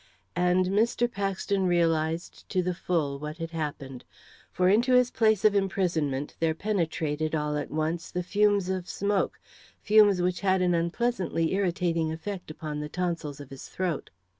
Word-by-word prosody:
And 180 +1 +3
Mr. 220 +5 +2
Paxton 195 -2 -1
realised 165 -1 0
to 185 - +1
the 180 0 -1
full 160 -6 -1
what 150 +2 -6
had 165 -1 -5
happened. 145 -5 -5 0.5
For 180 - +2
into 235 +7 +4
the 250 0 +3
place 220 -3 +2
of 215 - +6
his 200 - +4
imprisonment 160 -8 -1
there 160 -1 +1
penetrated, 160 -5 -1
all 150 -1 -1
at 145 - -3
once, 160 +2 -2
the 180 - -3
fumes 205 0 +2
of 185 -1 -3
smoke 200 0 -1 0.4
fumes 210 -3 +5
which 180 0 0
had 190 -2 +2
an 180 -1 +2
unpleasantly 170 -1 0
irritating 175 -4 0
effect 180 +3 -6
upon 155 -1 -5
the 150 0 -5
tonsils 170 -5 -3
of 140 -2 -11
his 135 - -9
throat. 180 -5 -3
175 Hz, 165 wpm, -27 LUFS, 160-195 Hz, 0.5 s, of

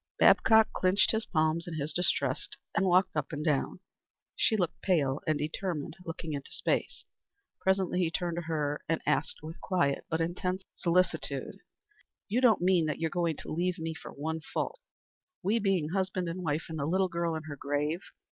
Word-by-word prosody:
Babcock 220 0 +6
clinched 185 +2 +3
his 220 0 -1
palms 160 +1 +1
in 170 - -4
his 150 0 -1
distress 180 +3 +1 0.3
and 195 - +3
walked 185 0 +3
up 150 -2 -1
and 150 0 -4
down. 150 +4 0 0.5
She 220 - +3
stood 180 -5 +1
pale 150 -7 +1
and 155 -1 +2
determined 160 0 -3
looking 165 -2 -5
into 140 -1 -5
space. - - -1 0.6
Presently 190 -1 +1
he 175 -3 +2
turned 170 +1 -2
to - - 0
her 150 -2 -1
and 165 - 0
asked - - 0
with 160 +2 -8
quiet 175 -7 +1
but 160 - 0
intense 180 +3 -1
solicitude, 175 0 0 0.7
"You 230 +5 +1
don't 225 -8 +5
mean 180 -3 +4
that 150 - -1
you're 165 -1 -1
going 170 -3 0
to - - -8
leave 180 +3 0
me 160 -1 -3
for - - -10
one 160 +3 -3
fault, 475 - -3 0.6
we 210 +5 +2
being 190 -7 +1
husband 185 0 -1
and 175 +2 -4
wife 155 -1 -1
and 160 -1 -5
the 140 - -1
little 190 +3 +2
girl 170 -1 -1
in 160 - -4
her 150 -2 -6
grave? 145 +5 -1
170 Hz, 185 wpm, -30 LUFS, 155-185 Hz, 0.7 s, Babcock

